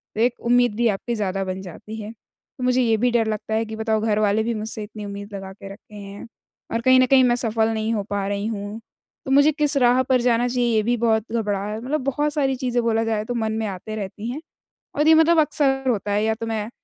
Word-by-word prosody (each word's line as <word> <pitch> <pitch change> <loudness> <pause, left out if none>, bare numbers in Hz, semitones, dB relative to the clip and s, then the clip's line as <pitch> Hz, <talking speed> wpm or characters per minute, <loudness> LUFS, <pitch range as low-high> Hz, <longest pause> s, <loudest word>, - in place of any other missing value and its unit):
तो 220 - -1
एक 245 +1 +1
उम्मीद 245 -3 +3
भी 235 +1 +2
आपकी 230 +4 -2
ज़्यादा 195 -2 -2
बन 185 0 -4
जाती 195 +4 -9
है, 210 +1 -7
तो 230 +3 -15
मुझे 250 0 +2
ये 225 -2 +3
भी 245 +2 +1
डर 230 -2 +2
लगता 215 +1 -4
है 225 +1 +1
कि 220 - -7
बताओ 220 -1 0
घरवाले 215 0 +1
भी 235 +1 -1
मुझसे 215 0 -4
इतनी 210 0 -8
उम्मीद 200 +1 -8
लगा 195 -1 -7
के 195 0 -11
रखे 210 0 -17
हैं, 200 0 -9 0.5
और 230 - 0
कहीं 255 +1 +5
न 255 - +5
कहीं 260 0 +5
मैं 240 -1 +3
सफल 225 -2 +1
नहीं 220 +1 -1
हो 205 -2 -1
पा 200 -1 -1
रही 200 +1 -2
हूँ, 210 0 -5 0.5
तो 265 - -3
मुझे 285 +3 +5
किस 295 -1 +2
राह 250 0 +4
पर 255 -1 +2
जाना 240 0 +2
चाहिए 240 -2 0
ये 215 - +2
भी 240 +2 +1
बहुत 220 -1 0
घबरा 205 -3 -1
मतलब 265 +5 -2
बहुत 290 +2 -1
सारी 270 -3 +1
चीज़ें 245 -2 -1
बोला 225 -1 +1
जाए 220 -2 -1
तो 245 - -4
मन 220 -2 -1
में 220 -1 -2
आते 200 +3 -6
रहती 210 +2 -5
हैं। 295 - -6 0.5
और 295 +2 +2
ये 320 - +8
मतलब 320 +1 +5
अक्सर 270 -3 +1
होता 205 -3 -1
है 205 +1 +1
या 220 0 +1
तो 230 +1 -6
मैं 220 -1 -3
225 Hz, 250 wpm, -22 LUFS, 210-250 Hz, 0.5 s, ये